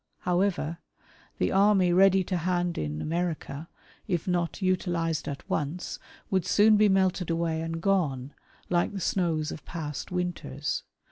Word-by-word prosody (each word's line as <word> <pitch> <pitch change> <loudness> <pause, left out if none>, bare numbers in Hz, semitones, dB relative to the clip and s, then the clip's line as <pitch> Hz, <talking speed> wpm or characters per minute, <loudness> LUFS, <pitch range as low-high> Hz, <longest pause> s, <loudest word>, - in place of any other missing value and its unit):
However, 175 -3 0 0.3
" - - -29
the - - +1
army 195 -2 +4
ready 190 +1 +5
to 185 0 -2
hand 175 0 0
in 75 0 -3
America, 165 -2 -3 0.4
if 175 -4 -1
not 175 -2 0
utilized 175 -4 0
at 140 - -6
once, 155 +4 -3
" - - -25
would 190 -2 +2
soon 215 +1 +5
be 210 0 +5
melted 190 -2 +2
away 165 -1 0
and 165 0 -3
gone, 150 -8 0 0.3
like 175 +3 +1
the 200 - -3
snows 165 -4 0
of - - -8
past 150 -2 -5
"winters. 155 -6 -2
175 Hz, 150 wpm, -28 LUFS, 160-185 Hz, 0.4 s, ready